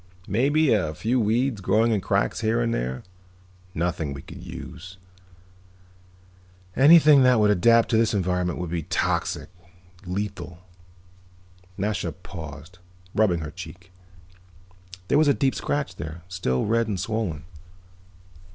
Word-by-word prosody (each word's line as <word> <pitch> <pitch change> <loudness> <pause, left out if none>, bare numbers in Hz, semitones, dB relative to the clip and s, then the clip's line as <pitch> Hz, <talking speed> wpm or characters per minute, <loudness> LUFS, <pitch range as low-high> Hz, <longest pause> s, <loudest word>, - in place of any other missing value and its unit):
Maybe 140 +8 +2
a 80 -8 0
few 120 +9 0
weeds 115 +1 0
growing 110 +5 +2
in 105 -3 +1
cracks 100 +3 0
here 115 +1 +1
and 115 -1 0
there. 65 +1 -3 0.7
Nothing 80 -3 -2
we 70 - -9
could - - -11
use. 90 +2 -9 1.8
Anything 150 0 +7
that 125 -2 +5
would 105 -1 +4
adapt 115 +4 +4
to 110 - +2
this 115 0 +2
environment 90 -2 -1
would 85 -2 -5
be 85 -1 -1
toxic, - - -2 0.6
lethal." 95 -2 -4 1.2
Nasha 100 -4 -2
paused, 80 -1 -10 0.3
rubbing 95 -6 +2
her 75 -1 -6
cheek. 90 +2 -11 1.2
There 145 - +3
was 155 - +4
a 140 - +4
deep 135 -1 +1
scratch 145 -1 -3
there, 80 +2 -7
still 90 -9 -1
red 115 +1 +1
and 100 -4 -2
swollen. 105 -9 -3
100 Hz, 130 wpm, -24 LUFS, 85-115 Hz, 1.8 s, Anything